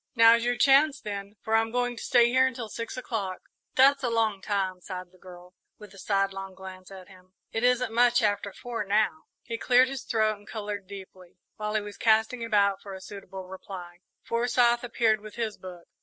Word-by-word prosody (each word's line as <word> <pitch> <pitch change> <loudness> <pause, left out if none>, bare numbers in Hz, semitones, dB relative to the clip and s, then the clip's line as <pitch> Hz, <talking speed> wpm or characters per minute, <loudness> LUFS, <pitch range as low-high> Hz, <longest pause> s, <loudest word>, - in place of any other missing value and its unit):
"Now's 230 0 +6
your 245 0 0
chance, 280 +1 +5
then, 200 -1 -6
for 220 - -3
I'm 225 0 +2
going 245 +1 -1
to - - -9
stay 240 -1 +4
here 260 +1 +4
until 235 -3 -5
six 230 +3 -6
o'clock." 205 -7 -3 0.4
"That's 275 +1 +5
a 250 - 0
long 220 -4 0
time," 190 -3 -2
sighed 180 -1 -7
the 185 - -23
girl, 180 0 -13 0.2
with 210 -2 -13
a 195 - -13
sidelong 195 -1 -1
glance 185 -1 -10
at 190 -2 -11
him. 185 -1 -19 0.2
"It 225 - -2
isn't 250 -1 +2
much 240 0 +4
after 205 -1 0
four 235 +2 -5
now." 215 +9 0 0.2
He 230 -2 -5
cleared 255 +1 +4
his 270 -2 -5
throat 215 -2 0
and 205 - -20
coloured 205 -3 -5
deeply. 190 -2 -12 0.2
While 210 0 -3
he 215 - +2
was 205 0 -9
casting 225 +2 +2
about 200 -3 +2
for 195 -1 -8
a - - -8
suitable 195 -1 -9
reply, 185 -2 -9 0.2
Forsyth 240 0 +2
appeared 225 -3 +1
with 215 -1 -11
his 225 -3 -3
book. 180 -2 -11
215 Hz, 200 wpm, -27 LUFS, 195-235 Hz, 0.4 s, Now's